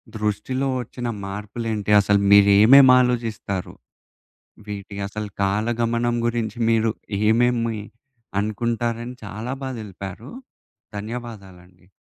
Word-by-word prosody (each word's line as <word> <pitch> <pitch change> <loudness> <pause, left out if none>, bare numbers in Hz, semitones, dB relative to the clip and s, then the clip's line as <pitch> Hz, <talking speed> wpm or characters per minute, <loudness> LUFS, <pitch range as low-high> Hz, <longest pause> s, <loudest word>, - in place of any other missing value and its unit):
దృష్టిలో 110 +6 -2
ఒచ్చిన 120 +1 -6 0.2
మార్పులేంటి, 105 +1 -4
అసలు 100 +1 +2
మీరేమేం 105 +7 +7
ఆలోజిస్తారు. 115 -6 -2 1.0
వీటి 100 0 -7
అసలు 105 +1 -5
కాలగమనం 115 +4 0
గురించి 115 -2 -2
మీరు 115 0 +2 0.4
ఏమేమి 115 -1 +1 0.6
అనుకుంటారని 115 +3 -2
చాలా 110 +5 -5
బాగా 130 -2 -4
తెలిపారు. 100 +3 -9 0.7
ధన్యవాదాలండి. 100 -5 -9
110 Hz, 85 wpm, -22 LUFS, 100-120 Hz, 1.0 s, మీరేమేం